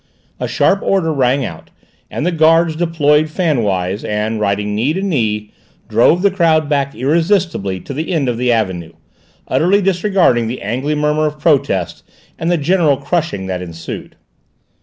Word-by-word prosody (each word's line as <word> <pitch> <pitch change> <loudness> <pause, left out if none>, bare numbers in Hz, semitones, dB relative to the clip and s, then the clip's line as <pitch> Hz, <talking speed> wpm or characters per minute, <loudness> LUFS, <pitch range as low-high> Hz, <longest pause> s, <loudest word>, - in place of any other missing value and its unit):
A - - -2
sharp 195 - +2
order 175 -5 +1
rang 135 -1 +1
out, 80 -6 -9 0.4
and 150 - -3
the 180 - +1
guards 165 0 +3
deployed 155 -2 +2
fan 155 -6 0
wise 95 -1 -1
and, 105 +1 -2
riding 105 0 -1
knee 120 +9 0
to 190 - -3
knee, 110 - -1 0.4
drove 120 - +3
the 200 - +4
crowd 160 -5 +2
back 140 -2 -1
irresistibly 160 - 0
to - - -7
the 155 +6 -4
end 155 -6 0
of 120 -2 -1
the 125 0 +1
avenue, 95 -7 -1 0.5
utterly 190 +5 +2
disregarding 185 - +2
the 120 +3 -5
angry 130 +8 -2
murmur 150 +1 +1
of 150 0 -5
protest, 140 - 0 0.4
and 165 - -1
the 175 - +2
general 155 -2 +2
crushing 150 - -2
that 90 -1 -3
ensued. 85 -2 -8
145 Hz, 160 wpm, -16 LUFS, 110-165 Hz, 0.5 s, the